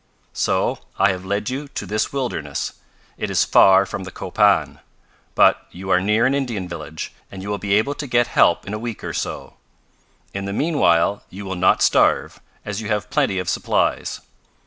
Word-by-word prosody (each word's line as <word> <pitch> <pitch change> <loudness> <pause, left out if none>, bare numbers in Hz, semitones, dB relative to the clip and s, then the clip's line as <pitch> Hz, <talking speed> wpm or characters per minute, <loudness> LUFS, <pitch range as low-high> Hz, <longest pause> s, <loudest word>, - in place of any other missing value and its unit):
"So - - 0 0.2
I 95 +1 +4
have 95 0 -6
led 100 +4 -2
you 140 +3 -4
to 140 - -6
this 105 +1 -1
wilderness. 120 - -3 0.5
It - - -2
is - - +2
far 95 0 +6
from 95 0 -6
the 95 - -7
Copan, - - +1 0.6
but - - +4
you 95 +1 -6
are 90 - +4
near 105 +4 +2
an 130 - +2
Indian 120 -9 -2
village, 80 -2 -7 0.2
and 95 -1 -8
you 100 - -6
will 105 -1 -2
be 100 +1 +1
able 110 +7 +1
to 145 0 -6
get 120 -1 +3
help 85 - +3
in 100 - -6
a 105 - -3
week 115 -1 -6
or - - -4
so. - - -5 0.8
In 100 0 -4
the 100 - -4
meanwhile 100 - +2
you 100 +2 -9
will 95 - -4
not 95 0 +3
starve, - - +2 0.2
as 105 +1 -4
you 105 - -5
have 105 +2 -2
plenty 140 -10 +1
of 90 -1 -3
supplies. - - 0
100 Hz, 190 wpm, -21 LUFS, 95-120 Hz, 0.8 s, far